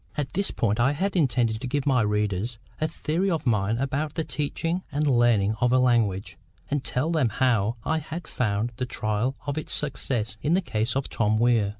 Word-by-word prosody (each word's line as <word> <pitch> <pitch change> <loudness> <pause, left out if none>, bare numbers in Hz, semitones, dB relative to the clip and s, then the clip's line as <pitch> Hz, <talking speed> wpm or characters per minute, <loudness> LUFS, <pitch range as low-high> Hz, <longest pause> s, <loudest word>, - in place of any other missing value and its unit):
At 145 -3 -2
this 200 +2 0
point 110 -1 0
I 130 +4 +3
had 195 +7 -1
intended 125 -8 +1
to 130 - -3
give 145 +2 -1
my 130 -4 +3
readers 105 +1 -1 0.2
a 155 - +1
theory 165 +4 -1
of 160 -6 -1
mine 110 -2 +1
about 140 +4 -2
the 160 - 0
teaching 165 +4 -2
and 145 +2 0
learning 120 -6 +3
of 120 0 +3
a 130 - +5
language; 115 -6 +1 0.3
and 145 -2 0
tell 145 +7 -1
them 155 -8 +2
how 115 -2 +1
I 160 - 0
had 160 +2 -6
found 110 0 -1
the 125 -1 -2
trial 110 +4 -1
of 145 +1 -1
it - - -8
succeed 125 -6 0
in 155 +4 +2
the - - +3
case 115 - -1
of 135 0 -1
Tom 110 -1 +1
Weir. 115 -3 +3
125 Hz, 205 wpm, -26 LUFS, 110-150 Hz, 0.3 s, a